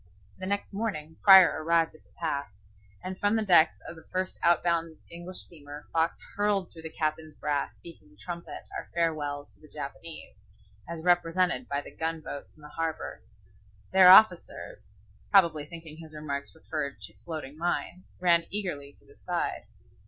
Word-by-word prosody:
The 185 - -5
next 200 +1 -2
morning 160 -7 -4
Prior 190 -5 +8
arrived 165 0 +2
with 155 - -19
the - - -30
pass, 140 - -3 0.5
and 185 0 -6
from 205 +2 +2
the 220 -1 0
decks 170 -4 +6
of - - -6
the 160 - -13
first 185 0 -2
out 170 -1 +4
bound 165 -2 0
English 175 +2 -5
steamer 145 -2 -9
Fox 165 0 +1 0.2
hurled 205 -3 0
through 165 - -11
the 160 - -6
captain's 155 -1 -3
brass 145 -1 -2
speaking 100 - -15
trumpet 170 +12 -7
our - - -6
farewells 150 -4 -1
to - - -22
the 155 - -15
Japanese, 150 -3 -8 0.5
as 165 -1 -6
represented 175 -5 +2
by 140 0 0
the - - -11
gun 165 0 -2
boats 145 -2 -8
in 155 - -20
the 150 - -10
harbor. 160 +1 -4 0.7
Their 190 -1 +8
officers, 185 - +5 0.4
probably 170 -7 +4
thinking 160 -1 -9
his 160 -1 -11
remarks 140 -1 -5
referred 150 -7 -4
to 105 +2 -8
floating 145 +4 -7
mines, 175 +2 -3
ran 170 -2 +4
eagerly 160 -9 -3
to - - -26
the 425 - -20
side. - - -3
165 Hz, 165 wpm, -28 LUFS, 150-180 Hz, 0.7 s, Prior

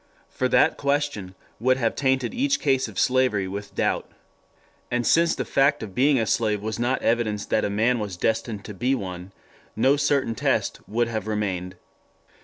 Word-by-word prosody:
For 130 - 0
that 155 - +3
question 140 -10 -1 0.2
would 130 +3 +2
have 115 -3 0
tainted 130 -3 0
each 280 +2 +1
case 135 -2 +1
of - - -11
slavery 125 -7 +2
with 100 +1 -7
doubt. - - -1 0.8
And 120 -1 -1
since 170 0 +3
the - - -3
fact 140 -2 +2
of 100 -3 -8
being 135 +4 +3
a 115 - +1
slave 105 -1 +1
was 110 +1 -3
not 125 +2 0
evidence 110 -3 0
that 110 - 0
a - - -1
man 115 +4 +1
was 100 -4 -5
destined 110 +1 -2
to 105 - -7
be 125 +8 0
one, 90 -4 -6 0.4
no 135 +6 +3
certain 140 -4 +1
test - - 0
would 120 +2 +1
have 110 -2 -4
remained. 95 -4 -2
115 Hz, 180 wpm, -24 LUFS, 105-130 Hz, 0.8 s, that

